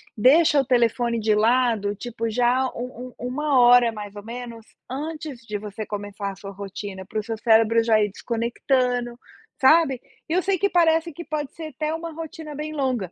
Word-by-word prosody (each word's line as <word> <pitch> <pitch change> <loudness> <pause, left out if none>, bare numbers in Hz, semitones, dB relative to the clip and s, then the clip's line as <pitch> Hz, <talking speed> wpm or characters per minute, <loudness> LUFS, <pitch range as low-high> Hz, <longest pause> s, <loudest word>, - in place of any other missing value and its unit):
Deixa 285 +6 +5
o 270 - -6
telefone 235 -1 +1
de 215 0 +2
lado, 220 -2 +2
tipo 230 0 -4
já 250 +3 +2
um 250 0 -6
um 245 - -4
1 280 0 +1
hora, 240 -1 +6
mais 210 -1 -8
ou 205 - -8
menos, 235 -1 -8 0.2
antes 300 -1 -5
de 210 -1 -3
você 210 +1 -6
começar 205 -1 -5
a - - -10
sua 195 +1 -9
rotina. 195 0 -7
Para 215 - -3
o - - -4
seu 225 0 -4
cérebro 225 0 +4
já 220 -2 +4
ir 205 - 0
desconectando, 240 +2 -1 0.4
sabe? 270 -2 +5 0.3
E - - -1
eu 365 - +3
sei 390 -1 +1
que 400 - +2
parece 330 -1 +3
que 340 - -8
pode 295 -3 -3
ser 320 -1 -6
até 305 +2 -2
uma 330 0 -5
rotina 320 -1 -8
bem 305 +1 -5
longa 255 - -1
245 Hz, 190 wpm, -23 LUFS, 220-295 Hz, 0.4 s, hora